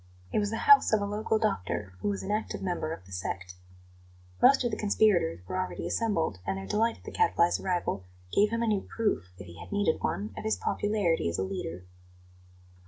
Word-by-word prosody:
It - - +3
was 205 -1 0
the 225 - -2
house 425 -1 +7
of 215 - +5
a 200 - -1
local 215 +2 0
doctor, 105 - -1
who - - -3
was 200 - -2
an 200 - -3
active 215 -1 -2
member 175 -4 -2
of 95 - -7
the 95 - -16
"sect." 95 0 -4 0.9
Most 275 -1 +6
of 240 - 0
the - - -1
conspirators 200 - +2
were 185 - -2
already 185 - -3
assembled, 165 - 0
and 95 +1 -2
their 95 - -6
delight 225 - +1
at - - -21
the - - -8
Gadfly's 175 - +2
arrival 175 - -1 0.3
gave 210 +1 +4
him 230 +1 -1
a - - 0
new 210 -3 +2
proof, 205 - -2
if 95 - -9
he 85 -1 -12
had - - -10
needed 205 -5 +1
one, 105 +1 -2
of - - -6
his 110 -2 0
popularity 185 - 0
as 85 - -3
a 95 - 0
leader. 90 -2 -5
185 Hz, 215 wpm, -29 LUFS, -, 0.9 s, house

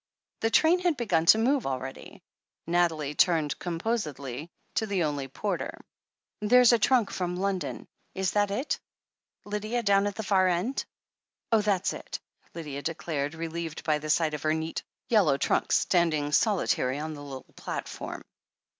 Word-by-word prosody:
The 225 - +1
train 325 +9 +4
had 350 -4 +1
begun 170 -9 +1
to 215 - +9
move 255 +3 +2
already. 130 0 -6 0.4
Nathalie 165 -4 +1
turned 160 -2 +2
composedly 165 - -3 0.2
to 220 - 0
the 195 -4 +1
only 145 -3 -2
porter. 185 +7 -3 0.6
"There's 245 +3 +6
a 235 - +4
tnmk 240 -2 +3
from 180 -1 -2
London. 185 -4 -2 0.3
Is 190 0 0
that 205 -1 +2
it, 255 +9 -1 0.7
Lydia, 215 +3 -2
down 200 -1 +4
at 205 - -4
the 220 - -4
far 190 -2 +3
end 185 +9 0 0.3
?" - - -61
"That's 210 -4 +2
it," - - -6 0.4
Lydia 150 -4 -5
declared, 155 -2 -3
relieved 165 -1 -5
by 155 -2 +1
the 155 +1 -6
sight 160 0 +2
of 150 - -4
her 155 +1 +1
neat 160 0 -3 0.3
yellow 190 -12 +4
trunk, - - +1
standing 155 -5 +2
solitary 150 - +2
on 155 +1 -4
the 145 - -9
little 135 -2 -8
platform. - - -6
175 Hz, 155 wpm, -28 LUFS, 155-210 Hz, 0.7 s, to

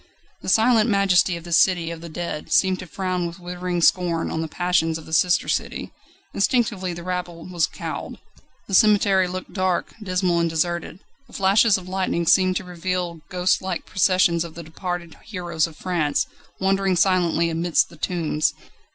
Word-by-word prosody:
The - - -4
silent 225 0 +4
majesty 195 -3 +3
of 170 - -10
this 170 -2 +3
city 175 -3 +1
of 165 -1 -7
the 170 - -8
dead 165 -2 -5
seemed 190 -1 +3
to 185 - -8
frown 180 0 -2
with 170 +2 -9
withering 180 0 -3
scorn 170 -2 +2
on 160 - -2
the 160 - -3
passions 165 -1 0
of 160 - -11
the 160 - -10
sister 180 +2 +3
city. - - -2 0.4
Instinctively 205 -4 0
the 175 0 -7
rabble 180 -2 -4
was 175 -3 0
cowed. - - -6 0.5
The 195 - -7
cemetery 200 -2 +4
looked 185 +1 -6
dark, 185 -2 -1
dismal, 185 -3 0
and 170 0 +1
deserted. 170 +2 -2 0.3
The - - -20
flashes 200 +2 +4
of 185 -1 -10
lightning 185 -2 -1
seemed 185 +2 +4
to - - -2
reveal 180 -1 -3
ghostlike 180 0 0
processions 185 -3 +2
of 170 -2 -10
the 170 - -7
departed 170 +1 -6
heroes 175 -6 -1
of 160 - -14
France, 170 -6 0 0.3
wandering 195 0 +1
silently 175 -2 +2
amidst 165 +1 +1
the - - -13
tombs. 155 -2 -1
180 Hz, 170 wpm, -23 LUFS, 170-185 Hz, 0.5 s, silent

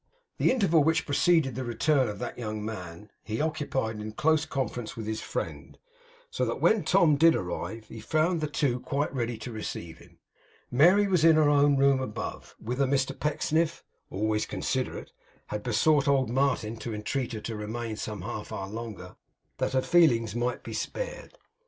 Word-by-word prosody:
The - - +4
interval 185 - +3
which 160 +2 +2
preceded 155 -1 +3
the 130 +3 -4
return 130 +3 +2
of 105 - -5
that 100 - -6
young 105 -2 -4
man, 95 -2 -7
he 110 0 -4
occupied 145 -8 -1
in 105 - -5
a - - -5
close 155 +6 +2
conference 125 -5 -3
with 110 - -5
his 110 0 -3
friend; - - -5 0.5
so 475 - -1
that - - -3
when 220 -5 +3
Tom 160 -3 +4
did 165 +2 +6
arrive, 110 +5 -4
he 115 - -10
found 155 +8 +1
the 155 - 0
two 140 -4 0
quite 140 +4 -2
ready 120 -3 -2
to 115 +3 -7
receive 85 -7 -6
him. - - -19 0.5
Mary 180 +10 +5
was 180 -5 +2
in 165 -1 +7
her 155 -2 +4
own 145 -1 +4
room 135 -1 +4
above, 120 -5 -6
whither 125 +5 -1
Mr 135 0 +1
Pecksniff, 155 +2 0 0.3
always 105 +2 -1
considerate, - - -3 0.4
had 105 - -3
besought 140 +7 +2
old 135 -4 +2
Martin 120 -4 0
to 110 0 -5
entreat 125 +4 -3
her 110 - -5
to 115 +1 -5
remain 110 +2 -4
some 105 -3 -5
half 105 0 -6
hour 95 0 -5
longer, 105 -5 -7 0.4
that - - 0
her 130 -1 +2
feelings 120 -11 +4
might 120 +1 -2
be - - -7
spared. - - -5
130 Hz, 180 wpm, -28 LUFS, 110-155 Hz, 0.5 s, in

